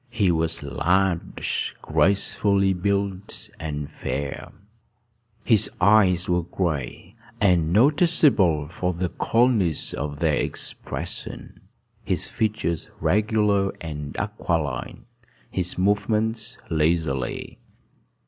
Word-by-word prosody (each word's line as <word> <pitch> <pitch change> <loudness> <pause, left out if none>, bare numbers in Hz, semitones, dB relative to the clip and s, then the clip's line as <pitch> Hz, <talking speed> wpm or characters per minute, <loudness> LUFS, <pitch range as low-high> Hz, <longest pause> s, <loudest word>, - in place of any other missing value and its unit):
He 105 -6 +2
was 80 -1 -1
large, 85 +6 0
gracefully 100 0 +2
built, 100 +1 -2
and 75 -2 -4
fair: 70 -1 -5 0.9
his 110 -5 +4
eyes 90 -2 +4
were 90 0 +2
gray, 85 0 -3 0.3
and 90 -5 +3
noticeable 120 - +4
for 90 +2 -2
the 90 +1 -1
coldness 115 - +1
of 75 0 -4
their 80 -2 +2
expression, - - -4 0.4
his - - -1
features 105 -7 -2
regular 105 -1 +2
and 75 -3 -6
aquiline, 75 -6 -3 0.5
his 90 -1 -2
movements 110 +4 0
leisurely. 80 -5 -1
90 Hz, 90 wpm, -24 LUFS, 80-105 Hz, 0.9 s, his